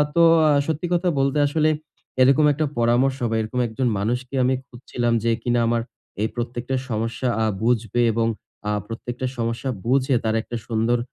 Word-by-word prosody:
তো 170 Hz, -, +5 dB, 0.3 s
আ -, -, +5 dB, 0.2 s
সত্যি 160 Hz, +2 st, -2 dB
কথা 175 Hz, +1 st, +2 dB
বলতে 135 Hz, +2 st, +1 dB
আসলে 155 Hz, +1 st, +2 dB, 0.5 s
এরকম 140 Hz, +4 st, +5 dB
একটা 155 Hz, +2 st, 0 dB
পরামর্শ 125 Hz, +3 st, +2 dB
বা, 115 Hz, -, -1 dB
এরকম 110 Hz, +3 st, -3 dB
একজন 120 Hz, +3 st, -2 dB
মানুষকে 125 Hz, +5 st, -2 dB
আমি 130 Hz, +1 st, +2 dB
খুঁজছিলাম। 120 Hz, -1 st, -2 dB
যে 115 Hz, -, +2 dB
কিনা 120 Hz, 0 st, +1 dB
আমার 115 Hz, 0 st, +1 dB, 0.4 s
এই 110 Hz, -, +2 dB
প্রত্যেকটা 120 Hz, +2 st, -3 dB
সমস্যা 115 Hz, +3 st, -2 dB, 0.2 s
আ -, -, +2 dB, 0.2 s
বুঝবে 115 Hz, -1 st, +1 dB
এবং 115 Hz, +1 st, +1 dB, 0.4 s
আ -, -, +1 dB, 0.2 s
প্রত্যেকটা 120 Hz, +2 st, -5 dB
সমস্যা 115 Hz, +3 st, -2 dB, 0.2 s
বুঝে 130 Hz, +1 st, +2 dB
তার 110 Hz, 0 st, 0 dB
একটা 120 Hz, -, -7 dB
সুন্দর 115 Hz, +1 st, +1 dB
120 Hz, 165 wpm, -23 LUFS, 115-135 Hz, 0.5 s, তো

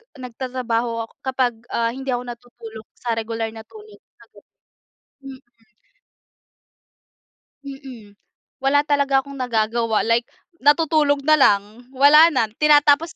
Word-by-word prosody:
nagtatrabaho 245 Hz, -2 st, -4 dB
ako -, -, -28 dB
kapag 260 Hz, -2 st, -1 dB, 0.2 s
ah 230 Hz, 0 st, -1 dB
hindi 265 Hz, +2 st, -6 dB
ako 245 Hz, -, -5 dB
natutulog 230 Hz, -2 st, -11 dB
sa 240 Hz, -, -5 dB
regular 225 Hz, 0 st, -4 dB
na 220 Hz, 0 st, -11 dB
tulog, 425 Hz, -1 st, -15 dB, 0.2 s
ayun. -, -, -21 dB, 0.8 s
Mhm. 265 Hz, -1 st, -10 dB, 2.2 s
Mhm. 265 Hz, -7 st, -11 dB, 0.5 s
Wala 285 Hz, +2 st, +2 dB
talaga 280 Hz, -2 st, +2 dB
akong 280 Hz, 0 st, -11 dB
nagagawa, 230 Hz, -2 st, -1 dB
like 230 Hz, +1 st, 0 dB, 0.3 s
natutulog 290 Hz, -1 st, +2 dB
na 310 Hz, +2 st, +4 dB
lang, 210 Hz, +1 st, +1 dB
wala 295 Hz, +4 st, +7 dB
na 235 Hz, -7 st, 0 dB
tinatapos 300 Hz, +1 st, +3 dB
255 Hz, 115 wpm, -20 LUFS, 230-285 Hz, 2.2 s, wala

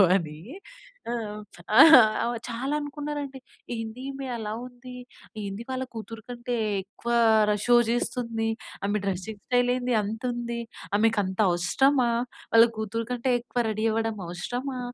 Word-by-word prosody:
ఉంటుందో -, -, +9 dB
అని. 155 Hz, -4 st, -4 dB, 0.7 s
ఆ! -, -, -1 dB, 0.7 s
ఆహ్, 245 Hz, -5 st, +7 dB
చాలా 245 Hz, +4 st, -3 dB
అనుకున్నారండి. 290 Hz, -1 st, -5 dB, 0.4 s
"ఏంది 225 Hz, +2 st, -6 dB
ఈమె 270 Hz, 0 st, -6 dB
అలా 210 Hz, -1 st, -4 dB
ఉంది, 250 Hz, 0 st, -11 dB, 0.5 s
ఏందీ 200 Hz, +3 st, -5 dB
వాళ్ళ 260 Hz, 0 st, -2 dB
కూతురు 225 Hz, 0 st, -7 dB
కంటే 240 Hz, 0 st, -3 dB, 0.3 s
ఎక్కువ 230 Hz, +4 st, -6 dB, 0.4 s
ర -, -, +2 dB
షో 245 Hz, 0 st, +6 dB
చేస్తుంది, 230 Hz, -1 st, -1 dB, 0.4 s
ఆమె 205 Hz, +1 st, 0 dB
డ్రెసింగ్ 195 Hz, +2 st, -4 dB
స్టైల్ 245 Hz, 0 st, +2 dB
ఏంది 250 Hz, -1 st, -1 dB
అంత 220 Hz, +2 st, -5 dB
ఉంది, 235 Hz, 0 st, -4 dB, 0.4 s
ఆమెకు 225 Hz, 0 st, +3 dB
అంత 190 Hz, 0 st, -5 dB
అవసరమా, 240 Hz, +9 st, +2 dB, 0.4 s
వాళ్ళ 230 Hz, +1 st, +9 dB
కూతురు 220 Hz, +1 st, -3 dB
కంటే 245 Hz, +1 st, -1 dB
ఎక్కువ 240 Hz, 0 st, -2 dB
రెడీ 215 Hz, +1 st, -1 dB
అవ్వడం 225 Hz, -1 st, -1 dB
అవసరమా, 245 Hz, +10 st, -4 dB
235 Hz, 135 wpm, -26 LUFS, 215-250 Hz, 0.7 s, ఉంటుందో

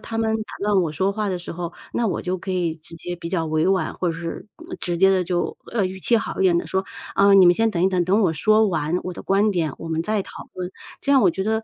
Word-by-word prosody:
他 225 Hz, -, -5 dB
们 220 Hz, -1 st, +1 dB
打 -, -, -10 dB
断 205 Hz, -3 st, +3 dB
我 165 Hz, -, -1 dB
说 190 Hz, +6 st, 0 dB
话 210 Hz, 0 st, -2 dB
的 185 Hz, -2 st, -2 dB
时 175 Hz, -, -7 dB
候， 175 Hz, 0 st, -5 dB, 0.2 s
那 235 Hz, -, 0 dB
我 205 Hz, -, -1 dB
就 185 Hz, +1 st, -1 dB
可 190 Hz, +2 st, -6 dB
以 175 Hz, -3 st, 0 dB
直 160 Hz, +1 st, -12 dB
接 175 Hz, +2 st, -5 dB
比 170 Hz, -1 st, -6 dB
较 170 Hz, -2 st, -1 dB
委 155 Hz, +1 st, +1 dB
婉， 190 Hz, -1 st, 0 dB
或 180 Hz, -, -1 dB
者 165 Hz, -, -5 dB
是， 170 Hz, +3 st, -6 dB
嗯， 345 Hz, +2 st, -8 dB
直 175 Hz, -1 st, -1 dB
接 195 Hz, +2 st, +5 dB
地 185 Hz, -1 st, +3 dB
就， 175 Hz, 0 st, -2 dB, 0.2 s
呃， 215 Hz, -5 st, +1 dB
语 190 Hz, +1 st, -7 dB
气 235 Hz, -, +4 dB
好 225 Hz, -, -3 dB
一 -, -, +3 dB
点 180 Hz, -2 st, +4 dB
地 -, -, -4 dB
说： 190 Hz, 0 st, -1 dB, 0.3 s
“啊， 200 Hz, 0 st, +5 dB
你 190 Hz, -2 st, +8 dB
们 175 Hz, -, +6 dB
先 225 Hz, +4 st, +2 dB
等 175 Hz, -4 st, -1 dB
一 190 Hz, -, +5 dB
等， 185 Hz, -2 st, +1 dB
等 195 Hz, +5 st, +2 dB
我 175 Hz, -, +2 dB
说 215 Hz, +8 st, +3 dB
完 160 Hz, -1 st, -1 dB
我 180 Hz, -, -4 dB
的 -, -, -9 dB
观 200 Hz, +2 st, +2 dB
点， 165 Hz, -7 st, -1 dB
我 165 Hz, -, -7 dB
们 160 Hz, 0 st, -1 dB
再 210 Hz, +2 st, 0 dB
讨 -, -, -11 dB
论。” 180 Hz, -1 st, -5 dB, 0.3 s
这 280 Hz, -, +1 dB
样 270 Hz, -, +5 dB
我 -, -, +5 dB
觉 190 Hz, +3 st, -3 dB
得， 220 Hz, +1 st, +1 dB
185 Hz, 320 characters per minute, -22 LUFS, 170-205 Hz, 0.3 s, 你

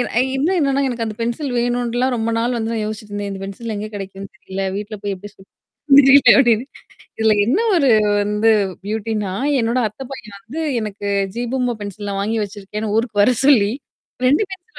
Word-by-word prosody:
அ -, -, +4 dB, 0.2 s
இன்னும் 335 Hz, +7 st, +1 dB
என்னான்னா, 275 Hz, -1 st, +1 dB
எனக்கு 235 Hz, -2 st, -3 dB
அந்த 215 Hz, -1 st, -5 dB
பென்சில் 245 Hz, +4 st, -2 dB
வேணும்ன்ட்டுலாம் 245 Hz, +1 st, 0 dB
ரொம்ப 225 Hz, 0 st, -1 dB
நாள் 240 Hz, +1 st, 0 dB
வந்து 225 Hz, 0 st, -2 dB
நான் 220 Hz, -, -2 dB
யோசிச்சுட்டு 215 Hz, -1 st, -7 dB
இருந்தேன். 205 Hz, 0 st, -4 dB
இந்த 195 Hz, 0 st, -7 dB
பென்சில் 215 Hz, +3 st, -6 dB
எங்க 210 Hz, +1 st, -4 dB
கெடைக்கும்ன்னு 195 Hz, 0 st, -8 dB
தெரியல. 195 Hz, +1 st, -5 dB
வீட்டுல 210 Hz, +1 st, -6 dB
போய் 200 Hz, -1 st, -1 dB
எப்படி 205 Hz, +2 st, -10 dB
சொல்லு 190 Hz, -, -19 dB, 0.6 s
தெரில 280 Hz, +1 st, +8 dB
அப்டின்னு. 240 Hz, -2 st, +3 dB, 0.5 s
இதுல 220 Hz, -1 st, +3 dB
என்னா 350 Hz, -, +2 dB
ஒரு 280 Hz, -6 st, +3 dB, 0.3 s
வந்து 210 Hz, +2 st, +2 dB, 0.4 s
பியூட்டின்னா, 215 Hz, -2 st, -2 dB, 0.3 s
என்னோட 230 Hz, +2 st, 0 dB
அத்த 215 Hz, +6 st, -11 dB
பையன் 215 Hz, -6 st, -9 dB
வந்து, 265 Hz, +10 st, -6 dB, 0.2 s
எனக்கு 205 Hz, -1 st, -5 dB, 0.3 s
ஜீ 240 Hz, -, -2 dB
பூம்பா 250 Hz, -2 st, 0 dB
பென்சில் 205 Hz, 0 st, -5 dB
வாங்கி 220 Hz, +3 st, -1 dB
வச்சிருக்கேன்னு, 205 Hz, +1 st, -6 dB
ஊருக்கு 220 Hz, -3 st, +1 dB
வரச் 250 Hz, +4 st, +2 dB
சொல்லி 220 Hz, -8 st, +5 dB, 0.5 s
2 285 Hz, +9 st, +4 dB
பென்சில் 380 Hz, +3 st, -11 dB
225 Hz, 180 wpm, -19 LUFS, 205-245 Hz, 0.6 s, தெரில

